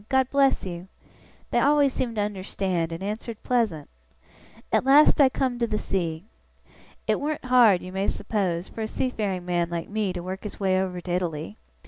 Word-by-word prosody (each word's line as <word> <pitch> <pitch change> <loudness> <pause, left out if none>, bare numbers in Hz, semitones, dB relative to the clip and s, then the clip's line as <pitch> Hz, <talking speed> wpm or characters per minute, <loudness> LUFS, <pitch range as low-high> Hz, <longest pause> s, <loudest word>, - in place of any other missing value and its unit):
God 265 -1 +2
bless 275 -5 +3
you!" 175 0 -6 0.6
they - - +3
always 285 -2 +4
seemed 235 -3 -2
to 210 - 0
understand, 185 -4 -2
and 165 +3 -5
answered 215 +2 -5
pleasant. 220 - 0 0.8
At - - +3
last 285 +3 +6
I 270 - +7
come 255 -2 -1
to 235 - +1
the 215 - -1
sea. 170 -4 -2 0.8
It - - +1
warn't 300 -1 -3
hard, 240 -7 +5
you 185 - -7
may 195 +1 -1
suppose, 190 -5 -1
for 225 - -8
a 220 - -1
seafaring 210 -7 -2
man 175 -1 0
like 170 -1 -4
me 210 -2 -1
to 175 -1 -5
work 185 +1 -5
his 210 - -8
way 190 -1 +2
over 180 -2 -3
to 175 - -6
Italy. 175 0 -2
200 Hz, 185 wpm, -25 LUFS, 180-245 Hz, 0.8 s, I